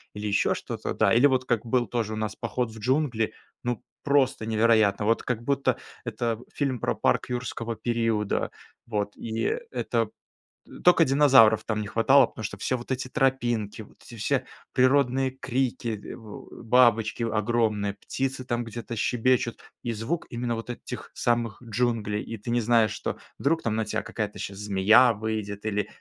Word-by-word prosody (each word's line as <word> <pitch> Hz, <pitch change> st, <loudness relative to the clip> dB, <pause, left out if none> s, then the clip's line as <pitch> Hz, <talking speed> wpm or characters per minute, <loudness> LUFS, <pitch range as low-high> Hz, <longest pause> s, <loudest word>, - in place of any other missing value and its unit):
или 105 Hz, 0 st, -5 dB
ещё 100 Hz, -1 st, +2 dB
что-то, -, -, -4 dB
да. -, -, +3 dB
Или 120 Hz, +5 st, +6 dB
вот 130 Hz, -2 st, +1 dB
как 120 Hz, -2 st, 0 dB
был 120 Hz, -1 st, +1 dB
тоже 110 Hz, -2 st, -2 dB
у -, -, -3 dB
нас 110 Hz, -1 st, -3 dB
поход 120 Hz, -3 st, -2 dB
в 110 Hz, -, -11 dB
джунгли. 125 Hz, -1 st, 0 dB, 0.3 s
Ну, 120 Hz, -3 st, -2 dB, 0.2 s
просто 140 Hz, -6 st, +2 dB
невероятно! 110 Hz, -2 st, +3 dB
Вот, 115 Hz, +1 st, +2 dB
как 120 Hz, -2 st, -2 dB
будто 140 Hz, +1 st, +1 dB, 0.3 s
это 115 Hz, -2 st, -2 dB
фильм 135 Hz, -4 st, -1 dB
про -, -, -1 dB
парк -, -, +1 dB
юрского 120 Hz, -2 st, -3 dB
периода. 115 Hz, -2 st, 0 dB, 0.4 s
Вот, 105 Hz, -2 st, -2 dB
и 115 Hz, -, -2 dB
это -, -, 0 dB, 0.8 s
тока 175 Hz, -1 st, +6 dB
динозавров 130 Hz, -6 st, +6 dB
там 110 Hz, -1 st, -2 dB
не 105 Hz, -, -4 dB
хватало, 130 Hz, +5 st, +5 dB
потому 110 Hz, -, -9 dB
что 100 Hz, 0 st, -4 dB
всё 130 Hz, -, -1 dB
вот 120 Hz, +2 st, -9 dB
эти 130 Hz, 0 st, -2 dB
тропинки, 120 Hz, -6 st, 0 dB
вот -, -, -19 dB
эти 120 Hz, -, -12 dB
все 130 Hz, +4 st, 0 dB, 0.3 s
природные 130 Hz, 0 st, +3 dB
крики, 125 Hz, -2 st, -1 dB
э, -, -, -7 dB
в 110 Hz, -3 st, -11 dB
у -, -, -12 dB
бабочки 115 Hz, -2 st, +4 dB
огромные, 105 Hz, -2 st, 0 dB
птицы 130 Hz, +5 st, -4 dB
там 120 Hz, -1 st, -1 dB
где-то 115 Hz, +1 st, -6 dB
щебечут. 120 Hz, +1 st, +1 dB, 0.2 s
И 120 Hz, -1 st, -2 dB
звук 115 Hz, +11 st, -3 dB
именно 120 Hz, 0 st, -2 dB
вот 115 Hz, +2 st, -7 dB
этих -, -, -8 dB
самых 120 Hz, -3 st, 0 dB
джунглей, 110 Hz, -2 st, 0 dB
и 115 Hz, -, -6 dB
ты 110 Hz, +4 st, -8 dB
не 120 Hz, 0 st, +2 dB
знаешь, 115 Hz, -1 st, +3 dB
что -, -, -4 dB, 0.2 s
вдруг 160 Hz, +4 st, +1 dB
там 110 Hz, -2 st, -1 dB
на 110 Hz, -1 st, 0 dB
тебя -, -, -2 dB
какая-то 105 Hz, -2 st, -4 dB
щас 100 Hz, 0 st, -5 dB
змея 105 Hz, +4 st, +5 dB
выйдет 105 Hz, -1 st, -4 dB
или 105 Hz, -1 st, -1 dB
115 Hz, 175 wpm, -26 LUFS, 110-125 Hz, 0.8 s, Или